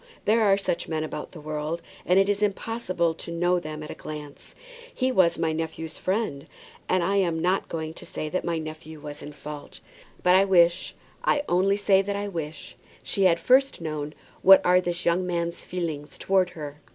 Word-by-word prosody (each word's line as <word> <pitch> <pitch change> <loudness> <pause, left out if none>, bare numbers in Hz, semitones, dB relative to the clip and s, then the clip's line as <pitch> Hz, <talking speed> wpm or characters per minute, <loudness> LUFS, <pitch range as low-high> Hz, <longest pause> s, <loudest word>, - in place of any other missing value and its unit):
There 225 +2 +4
are 200 -2 +5
such 180 -3 -2
men 155 -1 -1
about 155 - -6
the 170 - -10
world, 155 +2 -3 0.3
and 180 - +4
it 195 0 +5
is 205 0 0
impossible 195 -5 0
to 165 - -8
know 175 +1 +2
them 155 -2 -6
at 150 - -7
a - - -4
glance. 150 -2 -9 0.4
He 260 - 0
was 175 -7 +4
my 160 -1 0
nephew's 160 0 -4
friend, 185 -8 -2 0.4
and 185 -1 +2
I 195 +3 +1
am 175 -4 +2
not 180 +3 +1
going 160 -1 -4
to - - -11
say 155 - -4
that 185 +4 -2
my 170 -1 -1
nephew 155 0 -7
was 145 0 -8
in 150 - -8
fault. 150 0 -9 0.4
But 180 0 +6
I 190 - +6
wish, 175 -2 +3 0.3
I 290 - +2
only 190 +3 +3
say 195 -1 +4
that 200 +1 -3
I 205 0 -2
wish, 160 -5 -6 0.3
she 195 - +1
had 170 -2 +4
first 270 +2 +3
known 155 -2 -4 0.3
what 195 +1 +8
are 180 +1 +5
this 175 0 -3
young 180 +2 +2
man's 170 -1 -2
feelings 160 -5 -4
towards 190 -2 +1
her." 150 -1 -8
170 Hz, 200 wpm, -26 LUFS, 155-190 Hz, 0.4 s, what